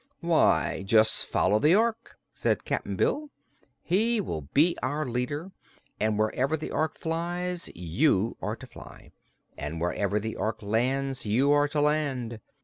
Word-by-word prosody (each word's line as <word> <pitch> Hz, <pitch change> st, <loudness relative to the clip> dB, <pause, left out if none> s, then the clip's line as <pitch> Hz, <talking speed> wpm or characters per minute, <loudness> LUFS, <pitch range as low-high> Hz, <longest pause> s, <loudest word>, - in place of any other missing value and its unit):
"Why, -, -, +2 dB
just 110 Hz, +2 st, +4 dB
follow 105 Hz, +3 st, +2 dB
the 155 Hz, +8 st, +5 dB
Ork," 230 Hz, +1 st, 0 dB, 0.2 s
said -, -, -1 dB
Cap'n -, -, -2 dB
Bill. 300 Hz, 0 st, 0 dB, 0.5 s
"He 220 Hz, +6 st, +2 dB
will 80 Hz, -, -3 dB
be 165 Hz, +5 st, +4 dB
our 145 Hz, +4 st, -1 dB
leader, 135 Hz, +8 st, -3 dB, 0.5 s
and 110 Hz, 0 st, +1 dB
wherever 125 Hz, +8 st, +1 dB
the 155 Hz, -, -6 dB
Ork 155 Hz, 0 st, -1 dB
flies 175 Hz, +2 st, -3 dB
you 95 Hz, -, +1 dB
are -, -, -2 dB
to -, -, -11 dB
fly, -, -, -13 dB, 0.5 s
and 75 Hz, +3 st, -4 dB
wherever 100 Hz, +4 st, 0 dB
the 110 Hz, +1 st, -5 dB
Ork 110 Hz, 0 st, -3 dB
lands 130 Hz, +4 st, -1 dB
you 130 Hz, +7 st, +3 dB
are 145 Hz, 0 st, +4 dB
to 145 Hz, 0 st, -1 dB
land. 140 Hz, -6 st, 0 dB
135 Hz, 145 wpm, -27 LUFS, 110-160 Hz, 0.5 s, the